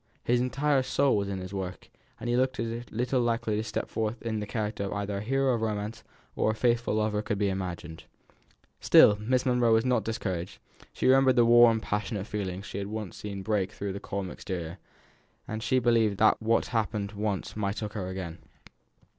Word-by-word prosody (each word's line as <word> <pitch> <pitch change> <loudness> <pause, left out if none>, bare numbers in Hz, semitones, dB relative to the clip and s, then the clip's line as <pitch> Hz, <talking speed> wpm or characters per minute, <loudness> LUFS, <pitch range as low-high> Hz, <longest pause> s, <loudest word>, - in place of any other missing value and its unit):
His 120 0 +2
entire 135 +2 +1
soul 135 +1 +2
was 100 -1 -1
in 100 - -3
his 95 +1 -7
work, 95 -2 -5 0.3
and - - -5
he 120 - +1
looked 130 +1 +1
as 115 +1 -4
little 125 +3 0
likely 115 -2 0
to 110 - -1
step 110 - -3
forth 110 +1 -2
in 110 -2 -2
the 105 - -5
character 105 -2 -3
of 95 - -4
either 100 -1 -3
a - - -3
hero 135 +4 +1
of 115 - -1
romance 110 0 -3 0.3
or - - +1
a 110 - 0
faithful 120 -1 +1
lover 105 -1 +1
as - - -3
could 105 - -1
be 100 0 +1
imagined. 90 -4 -5 0.7
Still 105 - +7
Miss 125 +4 0
Monro 125 -2 +3
was 110 +2 +4
not 125 -4 +2
discouraged; 95 -5 -3 0.3
she - - -4
remembered 130 0 +5
the 120 -2 +5
warm, 120 -1 +6
passionate 105 -2 -3
feeling 95 -3 -4
she 100 - -6
had 100 - -4
once 105 -2 -5
seen 100 -2 -6
break 105 -2 0
through 100 -2 -4
the 100 - -5
calm 95 -3 -4
exterior, 85 -3 -6 0.7
and 110 +1 -4
she 130 +3 +1
believed 115 -4 +3
that 110 +2 +4
what 115 +1 +2
had - - -10
happened 105 -2 -3
once 105 -2 -3
might 105 0 -2
occur 105 -3 -4
again. 90 -3 -6
110 Hz, 205 wpm, -28 LUFS, 100-120 Hz, 0.7 s, Still